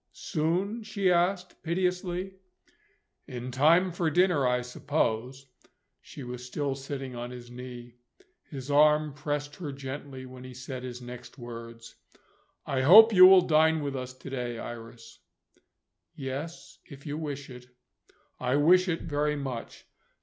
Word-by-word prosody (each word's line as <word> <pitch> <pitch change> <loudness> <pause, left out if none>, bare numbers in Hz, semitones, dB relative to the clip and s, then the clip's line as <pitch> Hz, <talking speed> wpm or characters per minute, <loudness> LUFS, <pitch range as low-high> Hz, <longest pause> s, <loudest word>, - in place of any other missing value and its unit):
"Soon?" 185 +7 -1
she 205 -4 0
asked, 180 +1 0
piteously. 180 +2 -2 0.9
"In 125 0 -6
time 165 +8 +4
for 170 -1 0
dinner, 175 -4 +3
I 125 0 +1
suppose." 125 0 -2 0.6
She 140 - -10
was 125 0 -7
still 140 +2 -2
sitting 135 -1 -6
on 120 0 -5
his 120 -1 -10
knee. 120 -1 -10 0.5
His 140 -1 -6
arm 150 0 +4
pressed 145 0 -4
her 160 -6 -5
gently 135 -1 -7
when 130 0 -11
he 130 -1 -10
said 130 0 -7
his 125 -1 -7
next 125 +2 -10
words, 115 -1 -10 0.7
"I 130 -1 -1
hope 215 +11 +9
you 185 -1 +10
will 190 -1 +8
dine 160 -1 +3
with 140 -1 -3
us 130 -1 -6
to 130 - -10
day, 120 -3 -3
Iris?" 115 0 -9 1.0
"Yes 140 +1 -6
if 140 0 -13
you 145 -1 -4
wish 145 -3 -5
it." 125 0 -11 0.7
"I 125 +1 0
wish 180 +6 +5
it 165 -2 -2
very 150 0 0
much. 130 -5 -6
140 Hz, 140 wpm, -28 LUFS, 125-160 Hz, 1.0 s, you